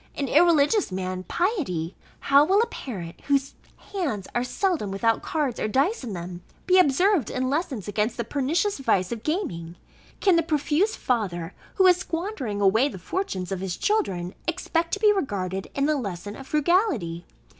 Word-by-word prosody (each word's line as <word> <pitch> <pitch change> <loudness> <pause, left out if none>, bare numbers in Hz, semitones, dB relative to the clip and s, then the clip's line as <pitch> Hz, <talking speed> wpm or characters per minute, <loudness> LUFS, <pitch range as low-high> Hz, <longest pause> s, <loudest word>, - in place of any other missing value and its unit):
an 280 - -2
irreligious 340 - +4
man, 185 0 -3
piety? 275 - -1 0.3
How 280 +1 +5
will 380 +6 +3
a 460 - +4
parent, 185 - -7
whose 275 -1 +1 0.4
hands 280 - -2
are 240 - +1
seldom 320 - -1
without 225 +4 +1
cards, 290 -7 -2
or - - 0
dice 275 - +1
in 230 -5 -5
them, 175 0 -6 0.2
be 370 0 +5
observed 355 - +3
in 255 0 -1
lessons 285 - -2
against 210 +3 -1
the 235 - -1
pernicious 295 - 0
vice 185 -9 +1
of 230 -2 -4
gaming? 175 - -3 0.4
Can 380 -4 +4
the - - +4
profuse 320 - +1
father, 185 -8 -2 0.2
who 380 - +4
is 360 -1 +7
squandering 330 - -3
away 220 +7 +4
the 195 - -8
fortunes 185 - -3
of 190 - -2
his 185 -2 -3
children, 190 - 0
expect 335 0 -1
to 405 - 0
be 420 -1 +5
regarded 195 - -2
in 280 +1 +1
a 305 - +2
lesson 205 - -5
of 270 - -10
frugality? 300 - +1
270 Hz, 170 wpm, -25 LUFS, -, 0.4 s, is